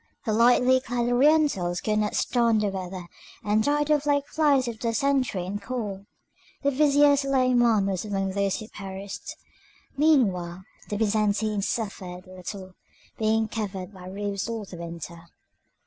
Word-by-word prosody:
The 220 - 0
lightly 250 +3 +5
clad 245 -1 -2
Orientals 245 - +3
could 215 -1 0
not 210 -1 -1
stand 230 -3 +2
the 210 - +1
weather, 185 -1 -6 0.4
and 210 +1 +2
died 295 +2 +1
off 295 -1 +2
like 285 -1 +2
flies 285 -4 +2
of 230 -2 -5
dysentery 250 -5 0
and 205 +3 -4
cold. 205 -4 -5 0.6
The 280 - +3
vizier 285 +1 +5
Suleiman 255 -6 +3
was 190 -2 -1
among 195 -2 -2
those 200 0 0
who 215 - -8
perished. 195 0 -7 0.6
Meanwhile 195 - +2 0.3
the 205 - -2
Byzantines 210 -1 +1
suffered 190 -6 -4
little, 185 +1 -8 0.5
being 220 0 +2
covered 200 -3 -5
by 185 -1 -11
roofs 200 +2 -3
all 225 -2 -4
the 185 - -10
winter. 170 0 -8
215 Hz, 145 wpm, -26 LUFS, 195-255 Hz, 0.6 s, lightly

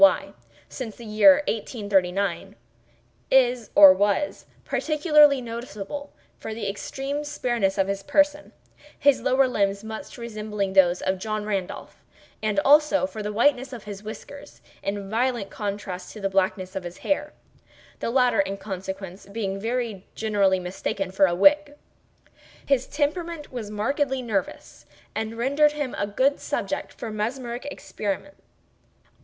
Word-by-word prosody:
Y., 295 - +5 0.3
since 230 -5 -7
the 235 - -11
year 275 +7 +6
1839, 200 - -1 0.7
is 250 -4 +3
(or 195 -2 +10
was) 205 +9 0 0.2
particularly 300 -3 +4
noticeable 235 +3 -6 0.3
for 220 - -6
the 215 -3 -4
extreme 270 +8 -4
spareness 240 -9 -1
of 195 - +2
his 200 0 -2
person—his 290 +1 0
lower 265 +1 +3
limbs 200 -4 0
much 220 +6 -8
resembling 210 -4 -4
those 180 -2 +4
of 190 0 0
John 215 +1 -3
Randolph; 195 -4 -4 0.4
and, 215 -2 +1
also, 295 +1 +5
for 220 -6 -6
the 210 0 -3
whiteness 255 +3 +2
of 235 - -8
his 205 -2 -8
whiskers, 280 +7 -10 0.2
in 200 0 -3
violent 230 -1 -1
contrast 200 -3 -5
to 215 - -9
the 195 -1 -2
blackness 190 -1 0
of 190 - -2
his 175 0 -8
hair—the 295 -4 -5
latter, 250 +2 +3
in 200 -10 0
consequence, 190 -1 -7
being 200 -2 -3
very 225 -3 -3
generally 200 -4 +2
mistaken 185 +1 -3
for 195 0 +4
a 175 - 0
wig. 290 +8 +4 0.9
His 265 -2 +1
temperament 315 +2 -2
was 235 -5 -5
markedly 260 +5 -1
nervous, 205 -6 -4 0.3
and 220 +1 -4
rendered 285 +5 +3
him 290 -4 -3
a 205 - -1
good 260 +7 +1
subject - - -3
for 225 - -7
mesmeric 240 +4 -4
experiment. 210 +2 -5
220 Hz, 135 wpm, -25 LUFS, 195-275 Hz, 0.9 s, or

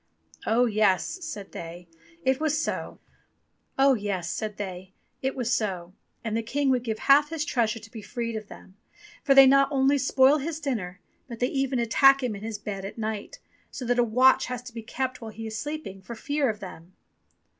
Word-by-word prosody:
"Oh 235 +3 +4
yes," 215 - +1
said 210 -11 -7
they, 170 +1 -8 0.4
it 265 +1 +2
was 310 -1 +1
so, - - -3 0.8
and 270 0 +5
the 195 -1 -4 1.6
King 270 +4 0
would 250 -2 +1
give 220 -3 -2
half 290 +4 +5
his 315 -2 -3
treasure 235 -8 0
to 225 0 -13
be 225 - -8
freed 230 +1 -4
of 215 -1 -6
them, 190 -1 -14 0.5
for 275 - +4
they 270 0 +10
not 275 +1 +5
only 275 +1 +3
spoil 265 +2 +4
his 310 +2 -4
dinner, 210 - -3 0.3
but 235 -3 -8
they 250 +2 0
even 270 -1 -1
attack 270 +4 +5
him 240 -4 -1
in 200 - -9
his 220 0 -4
bed 200 -2 -6
at 195 - -7
night, 220 - -4 0.3
so 255 - -7
that 245 +1 +1
a - - +6
watch 250 +3 +4
has 250 -1 -5
to 250 -1 -11
be 230 - -6
kept 255 +3 -4
while 225 - -6
he 225 +1 -8
is 220 0 -5
sleeping, 295 -10 -6
for 210 +5 -8
fear 285 +3 0
of 210 -1 -4
them." 180 -2 -10
240 Hz, 180 wpm, -26 LUFS, 210-270 Hz, 1.6 s, they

